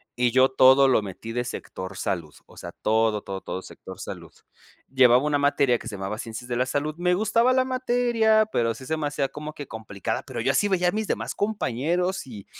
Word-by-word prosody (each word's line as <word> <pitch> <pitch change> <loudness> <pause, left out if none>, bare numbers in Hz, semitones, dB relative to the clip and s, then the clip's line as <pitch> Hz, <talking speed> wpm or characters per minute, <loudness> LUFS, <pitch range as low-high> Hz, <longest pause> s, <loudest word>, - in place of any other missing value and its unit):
y 125 0 +2
yo 130 +2 +5
todo 130 +1 +6
lo 125 -4 +3
metí 105 +3 -8
de 120 +1 -1
sector 95 -5 -7
salud, 85 -7 -3
o - - -19
sea, - - -8
todo, 110 -1 +2
todo, 95 -1 -6
todo 95 - -6
sector - - -11
salud, - - -8 0.6
llevaba 130 0 +5
una 145 -1 +1
materia 140 -4 +2
que - - -10
se 105 - -5
llamaba 95 +2 -5
Ciencias 115 0 -7
de 120 - -2
la 125 +1 0
Salud. 145 +3 -1
Me 180 0 +2
gustaba 230 +5 +2
la 255 0 +3
materia, 240 -4 +2
pero 115 -1 +1
sí 130 - -11
se 160 +4 -1
me 150 -2 -2
hacía 145 -2 -1
como 150 +2 -7
que 145 -3 -8
complicada, 100 -4 -4
pero - - -7
yo 130 +3 +2
así 205 +9 +2
veía 180 -2 +2
a - - 0
mis 215 +1 -2
demás - - -2
compañeros 180 - -1
y 105 -5 -10
130 Hz, 220 wpm, -25 LUFS, 115-180 Hz, 0.6 s, todo